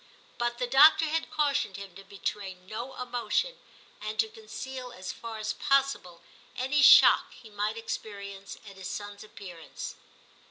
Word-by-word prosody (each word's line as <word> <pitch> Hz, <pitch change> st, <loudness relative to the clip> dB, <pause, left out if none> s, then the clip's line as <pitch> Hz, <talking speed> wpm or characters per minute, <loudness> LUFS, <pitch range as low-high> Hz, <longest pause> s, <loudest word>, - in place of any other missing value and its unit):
But 240 Hz, 0 st, -1 dB
the 250 Hz, -, -1 dB
doctor 290 Hz, +6 st, +7 dB
had 320 Hz, +1 st, -1 dB
cautioned 285 Hz, -10 st, 0 dB
him 200 Hz, -2 st, -9 dB
to 195 Hz, +2 st, -12 dB
betray 195 Hz, 0 st, -5 dB
no 215 Hz, +8 st, -7 dB
emotion, 250 Hz, -, -1 dB, 0.4 s
and 215 Hz, 0 st, -5 dB
to 220 Hz, 0 st, +3 dB
conceal 250 Hz, +4 st, -8 dB
as 185 Hz, -5 st, -6 dB
far 230 Hz, -1 st, -7 dB
as 215 Hz, 0 st, -2 dB
possible 275 Hz, -, 0 dB, 0.3 s
any 265 Hz, +3 st, +1 dB
shock -, -, +8 dB
he 225 Hz, -3 st, -15 dB
might 210 Hz, +2 st, -2 dB
experience 200 Hz, -3 st, -6 dB
at 195 Hz, -1 st, -12 dB
his 190 Hz, -1 st, -6 dB
son's 205 Hz, 0 st, -6 dB
appearance. 180 Hz, -5 st, -9 dB
220 Hz, 150 wpm, -29 LUFS, 200-260 Hz, 0.4 s, shock